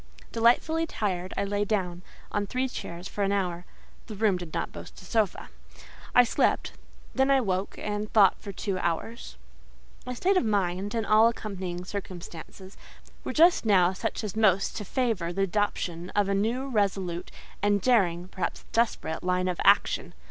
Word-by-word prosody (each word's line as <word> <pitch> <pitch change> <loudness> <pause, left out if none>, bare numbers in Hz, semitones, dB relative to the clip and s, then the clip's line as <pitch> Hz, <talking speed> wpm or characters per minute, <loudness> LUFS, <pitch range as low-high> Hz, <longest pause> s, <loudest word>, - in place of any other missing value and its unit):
Delightfully 280 +8 +3
tired, 185 - -2
I - - +1
lay 205 +1 0
down, 185 -4 -1 0.3
on 205 0 -1
three 255 +5 -1
chairs 175 -7 -7
for 205 - -3
an 195 - +1
hour 180 -3 -1 0.4
(the 215 - -7
room 205 -2 +2
did 175 -3 -6
not - - -3
boast - - -10
a - - -13
sofa). 220 -5 0 0.7
I 245 - +9
slept, 235 - +1 0.4
then 265 +1 +2
I 275 -1 +5
woke 190 -4 -2
and 210 0 -3
thought 200 -4 +5
for 200 - -6
two 195 -1 -3
hours. 170 - -3 0.7
My 250 0 -5
state 375 +9 +2
of - - +3
mind, 200 -1 0
and 225 -1 0
all 215 +2 +6
accompanying 190 -6 -4
circumstances, 185 -1 -8 0.5
were - - -3
just 340 +3 +5
now 190 -4 +4
such 225 +4 -3
as 210 -2 -4
most 195 -3 +3
to 210 - -5
favour 215 -7 -1
the 195 +2 0
adoption 180 -3 -1
of 205 -1 +3
a 200 - +1
new, 230 +7 0
resolute, 195 -7 -1 0.3
and 205 0 +3
daring—perhaps 185 -5 0
desperate—line 180 -5 0
of 180 -1 -2
action. - - +3
200 Hz, 165 wpm, -27 LUFS, 180-225 Hz, 0.7 s, I